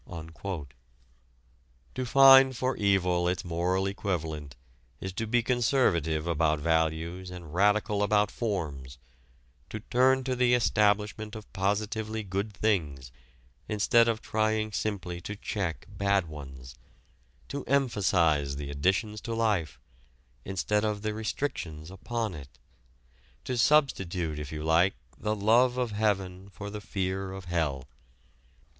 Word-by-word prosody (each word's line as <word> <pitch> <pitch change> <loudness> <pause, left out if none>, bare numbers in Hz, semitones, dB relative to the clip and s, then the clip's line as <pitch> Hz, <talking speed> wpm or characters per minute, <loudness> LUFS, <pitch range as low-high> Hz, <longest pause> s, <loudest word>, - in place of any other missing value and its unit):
To 130 - -3
find 135 0 +7
for 130 +1 0
evil 90 -3 +2
its 90 0 -1
moral 90 +3 0
equivalent 80 -8 -3 0.4
is 95 -1 -5
to 115 +4 -3
be 120 +1 +2
conservative 110 - +1
about 80 -2 +1
values 80 +3 -1
and 85 -4 -9
radical 105 +2 +2
about 105 0 +2
forms, 75 - -4 0.7
to 110 - -5
turn 130 +3 +3
to 130 0 -1
the 125 0 +4
establishment 105 -1 +1
of 110 -1 -11
positively 105 +3 -1
good 100 +2 -3
things 80 - -1 0.6
instead 110 +2 +4
of 115 -1 -1
trying 110 0 0
simply 90 -5 -3
to 100 - -6
check 100 -5 -3
bad 100 -2 0
ones, 65 -4 -10 0.8
to 140 0 -4
emphasize 90 - +2
the 70 0 -5
additions 95 +8 0
to 115 - -4
life, 105 -9 0 0.6
instead 105 +2 -1
of 105 -1 -2
the 105 0 -1
restrictions 90 - -4
upon 110 +2 -3
it, 70 -5 -11 0.9
to 125 - -3
substitute, 95 - +2
if 75 -1 -6
you 75 -1 -5
like, 85 +4 +3 0.2
the 105 0 -1
love 120 +5 +3
of 125 -3 -1
heaven 100 -3 -1
for 100 +2 -8
the 105 0 -6
fear 95 -1 -3
of 95 -1 -8
hell. 75 -6 -2
100 Hz, 125 wpm, -28 LUFS, 85-110 Hz, 0.9 s, find